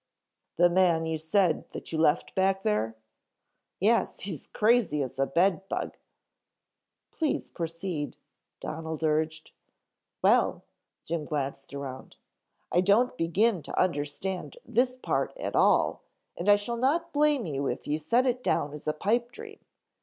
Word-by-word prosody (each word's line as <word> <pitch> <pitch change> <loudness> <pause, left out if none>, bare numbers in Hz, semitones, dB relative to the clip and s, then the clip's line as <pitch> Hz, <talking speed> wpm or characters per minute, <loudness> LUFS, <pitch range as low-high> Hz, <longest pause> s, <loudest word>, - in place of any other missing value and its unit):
"The 175 +1 +6
man 175 -2 +3
you 160 -1 -2
said 165 +1 +1
that - - -7
you 160 - -1
left 155 0 +2
back 190 0 +1
there?" 110 +2 0 0.8
"Yes. 225 +5 +2
He's 180 -8 -4
crazy 215 - +2
as 130 +1 -7
a 135 - +2
bed 185 +4 +2
bug - - -3 0.6
" - - -58
"Please 315 -3 -2
proceed," 165 -2 -4 0.4
Donald 160 0 -5
urged. 155 0 0 0.7
"Well," - - +3 0.4
Jim 165 -1 -3
glanced 140 -2 -4
around. 135 -2 -7 0.6
"I 175 - +4
don't 210 +7 +3
begin 180 +4 +2
to - - -4
understand 180 - -2
this 250 +2 +1
part 255 - -1
at - - -4
all - - +3 0.3
and 180 +4 -1
I 205 - +9
shall 205 +4 -3
not 325 +8 +1
blame 295 -4 +3
you 140 -3 -2
if - - -3
you 150 +1 -1
set 235 - +2
it 250 0 0
down 145 -10 0
as 150 0 -9
a 155 - +2
pipe 235 +9 0
dream." 435 - -10
175 Hz, 145 wpm, -28 LUFS, 155-230 Hz, 0.8 s, I